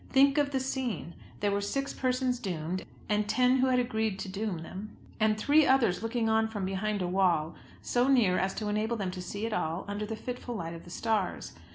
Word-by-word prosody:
Think 275 +2 +5
of 290 -1 +2
the 270 -2 0
scene! 255 - -3 0.3
There 205 0 +2
were 200 0 0
six 275 +7 -2
persons 255 -1 0
doomed, 180 -4 -3 0.2
and 210 0 +1
ten 250 +2 +4
who 260 0 +3
had 255 -1 +3
agreed 220 -5 0
to 195 - -5
doom 195 -4 -3
them; 195 +5 -8 0.2
and 215 -1 +3
three 290 +8 +5
others 240 -9 +3
looking 225 0 0
on 220 0 +3
from 210 -4 -3
behind 195 +1 -1
a - - -1
wall, 175 -4 +2 0.3
so 245 +1 +2
near 235 -9 +4
as 190 +1 0
to 215 - -3
enable 215 +3 0
them 195 -3 -2
to 180 0 -6
see 200 +4 -4
it 225 - -2
all, 165 -1 -1
under 205 +1 -3
the 225 - -3
fitful 245 +1 -5
light 165 -4 -4
of 165 - -10
the - - -11
stars! 215 0 -1
215 Hz, 220 wpm, -30 LUFS, 190-250 Hz, 0.3 s, Think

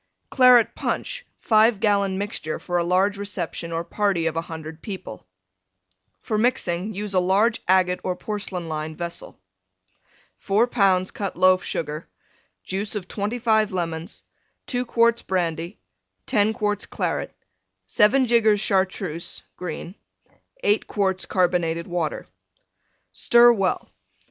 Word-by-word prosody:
CLARET 250 -3 +6
PUNCH - - -4
(5 220 -1 +4
gallon 200 -2 +1
mixture 195 -6 -4
for 175 0 -2
a - - +1
large 190 +3 +1
reception 175 -4 -4
or 165 0 -2
party 195 -3 0
of 165 - 0
100 160 -1 -6
people) 185 - -8 1.0
For 215 -2 -1
mixing 210 -5 0
use 205 0 -4
a 185 - +4
large 200 +6 +2
agate 180 -1 +3
or 185 - -1
porcelain 190 -4 -4
lined 155 0 -4
vessel. 170 -1 -7 1.0
4 210 +4 +2
lbs. 190 -6 +2
Cut 200 -2 -4
Loaf 185 0 +4
Sugar. 155 0 -4 0.6
Juice 200 +3 -3
of 190 -3 -4
25 220 +1 0
Lemons. 170 0 -4 0.4
2 250 -1 -2
quarts 235 0 +3
Brandy. 170 0 -2 0.5
10 215 -3 +2
quarts 210 -2 -2
Claret. - - -2 0.5
7 210 - +4
jiggers 220 -3 +3
Chartreuse 190 -4 -1
(green). 175 0 -6 0.7
8 420 -3 +2
quarts 190 -2 0
Carbonated 175 -2 +1
Water. 175 -3 -3 0.9
Stir 240 0 +6
well. 195 -4 -1
190 Hz, 120 wpm, -23 LUFS, 175-215 Hz, 1.0 s, CLARET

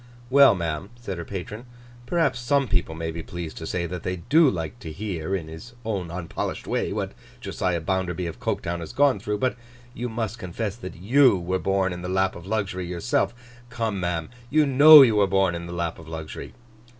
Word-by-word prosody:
'Well, 140 -5 +7
ma'am,' 85 +1 -3
said 100 -7 -6
her 85 - -5
patron, 105 +6 -7 0.4
'perhaps 160 -8 +1
some 135 +3 +1
people 90 -5 -1
may 80 0 -3
be 85 +1 -6
pleased 85 0 -7
to 80 - -6
say 85 -1 -2
that 90 0 -5
they 90 +2 -2
do 145 - +4
like 85 +4 -4
to 80 - -7
hear, 95 0 -3
in 85 -5 -4
his 80 +10 -10
own 100 -6 -2
unpolished 85 -1 -4
way, - - -1
what - - -3 0.3
Josiah 90 -3 -2
Bounderby, 90 0 -1
of 85 - -6
Coketown, 85 0 -2
has 85 -2 -7
gone 140 -6 +3
through. 105 +1 -2
But 130 +4 0 0.4
you 125 0 -4
must 115 0 -3
confess 100 +2 -4
that 95 -6 -8
you 120 +5 +4
were 90 +1 -2
born 95 -1 0
in 90 - -7
the 90 - -5
lap 95 0 +1
of 85 +1 -10
luxury, 95 -4 -2
yourself. 90 +6 0 0.3
Come, 115 -4 -2
ma'am, 85 -2 -2 0.2
you 155 +3 +4
know 145 +2 +10
you 115 -5 +3
were 100 -1 +4
born 95 -1 +2
in 85 0 -5
the - - -7
lap 85 -1 -3
of 80 - -12
luxury. 80 -1 -7
95 Hz, 205 wpm, -25 LUFS, 85-115 Hz, 0.4 s, know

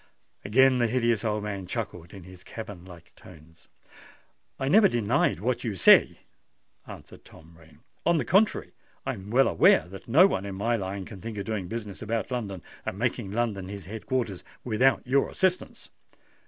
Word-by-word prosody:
Again 130 +4 +4
the 120 - +2
hideous 115 -1 0
old 105 -2 -1
man 100 -3 -5
chuckled 90 -6 -5
in 95 -3 -11
his 90 0 -14
cavern 105 -5 -9
like 90 -3 -14
tones. 85 -1 -17 0.9
"I 135 - -2
never 200 +7 +6
denied 115 - +1
what 120 +5 -1
you 110 -4 -3
say," 90 - +5 0.7
answered - - -12
Tom 80 +1 -17
Rain. 80 -1 -20 0.2
"On 170 -1 +3
the - - -1
contrary, 200 +4 +2 0.3
I - - -1
am 95 +1 -10
well 130 +4 +4
aware 80 - +4
that 95 0 -11
no 150 +11 +6
one 100 - 0
in 100 - -6
my 115 +5 0
line 95 -2 -4
can 100 -3 -11
think 115 0 -7
of 100 - -4
doing 105 -4 -3
business 105 -1 -6
about 115 +3 -3
London, 100 -8 -4 0.2
and 95 - -5
making 120 -2 -2
London 105 -3 -2
his 100 -3 -8
head 110 +3 -9
quarters, 115 -8 -2 0.2
without 125 +4 +2
your 135 +2 +2
assistance." 185 -1 -2
105 Hz, 180 wpm, -27 LUFS, 95-120 Hz, 0.9 s, never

